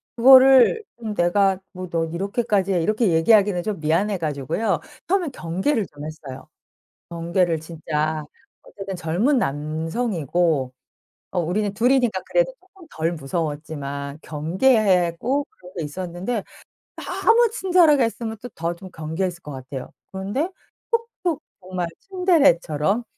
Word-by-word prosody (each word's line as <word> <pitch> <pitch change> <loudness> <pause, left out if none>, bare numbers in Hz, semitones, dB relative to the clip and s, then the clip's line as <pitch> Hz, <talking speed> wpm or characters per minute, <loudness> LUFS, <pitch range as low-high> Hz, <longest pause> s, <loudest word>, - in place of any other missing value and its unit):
그거를 265 - +7 0.2
음 220 -2 -3
내가 190 +1 +2
뭐 185 -2 -7
"너 165 -1 0
이렇게까지 195 +3 0
해." 175 - +2
이렇게 215 +4 +1
얘기하기는 190 +2 +4
좀 205 -3 -3
미안해 175 +7 +1
가지고요 160 - -1 0.3
처음엔 360 -5 +1
경계를 195 - -1
좀 145 0 -10
했어요. 145 -4 -9 0.6
경계를 170 -1 0
진짜 155 -1 -3 0.4
어쨌든 195 -1 -7
젊은 180 - +1
남성이고 160 - -1 0.6
어 180 - 0
우리는 195 +5 -1
2 240 +4 +2
이니까 245 -8 +2
그래도 - - +2
쪼끔 375 -2 -18
덜 165 +2 -1
무서웠지만 145 -2 -4
경계하고 190 - +2
그러고 180 0 -10
있었는데 180 +7 -4 0.5
너무 465 0 +2
친절하게 355 - +4
했으면 225 -1 -3
또 245 - -7
더 170 +1 -3
좀 185 +2 -11
경계했을 170 +3 -3
것 150 - -9
같아요. 130 0 -7 0.2
그런데 205 - -2 0.4
툭툭 460 -8 -1 0.2
정말 180 -2 -4
츤데레처럼 275 - +2
185 Hz, 300 characters per minute, -23 LUFS, 160-235 Hz, 0.6 s, 그거를